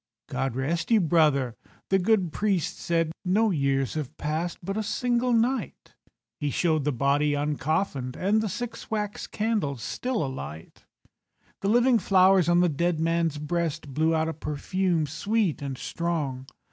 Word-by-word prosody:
"God 135 -3 -2
rest 155 +6 -1
you, 225 -2 +5
brother," 150 - +2 0.3
the 195 - +4
good 185 -4 +2
priest 200 -6 0
said, 165 -2 0
"No 205 +4 +2
years 135 -4 0
have 150 -1 -5
passed—but 170 +5 -3
a 220 - 0
single 240 +3 0
night." 240 +3 0 0.5
He 145 - -1
showed 155 -1 +1
the 150 - +2
body 140 +3 +2
uncoffinèd, 145 -2 -1
And 210 +3 +2
the 220 - -2
six 245 +4 -6
wax 210 -2 -3
candles 205 - -1
still 245 - -2
alight. 105 - -8 0.7
The 195 - -1
living 240 +1 +4
flowers 185 -2 +4
on 175 0 +5
the 180 - +4
dead 170 +2 0
man's 165 -1 +1
breast 155 -2 -2
Blew 160 +3 +2
out 160 0 +1
a 165 - -2
perfume 165 +3 -1
sweet 180 +4 -1
and 135 -2 -4
strong. 145 -4 -3
165 Hz, 150 wpm, -26 LUFS, 145-200 Hz, 0.7 s, you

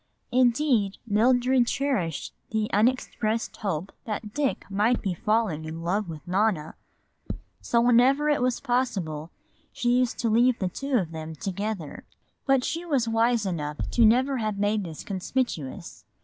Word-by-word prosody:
Indeed, 245 -4 +2
Mildred 245 +3 +3
cherished 235 - -1 0.2
the 220 -1 -1
unexpressed 225 0 0
hope 190 -3 -3
that 210 -1 -5
Dick 290 -3 -1
might 210 +5 +1
be 195 -3 -2
falling 210 -4 0
in 160 +1 -6
love 190 +2 -1
with 155 -2 -9
Nona. 185 -4 0 0.9
So 235 - +2
whenever 250 +5 +4
it 295 -3 +2
was 250 -1 +1
possible 190 - -1 0.4
she 245 +1 +1
used 250 -2 0
to 235 - 0
leave 240 +2 +4
the 185 - -1
two 275 +7 -1
of 175 -7 -2
them 160 0 -6
together. 195 -1 -4 0.4
But 270 -2 +4
she 330 +5 -2
was 275 -9 0
wise 230 0 +2
enough 150 -5 -3 0.2
never 250 +4 +4
to - - -3
have 215 -2 -2
made 205 0 0
this 160 -3 -8
conspicuous. 195 - -3
220 Hz, 150 wpm, -26 LUFS, 185-250 Hz, 0.9 s, whenever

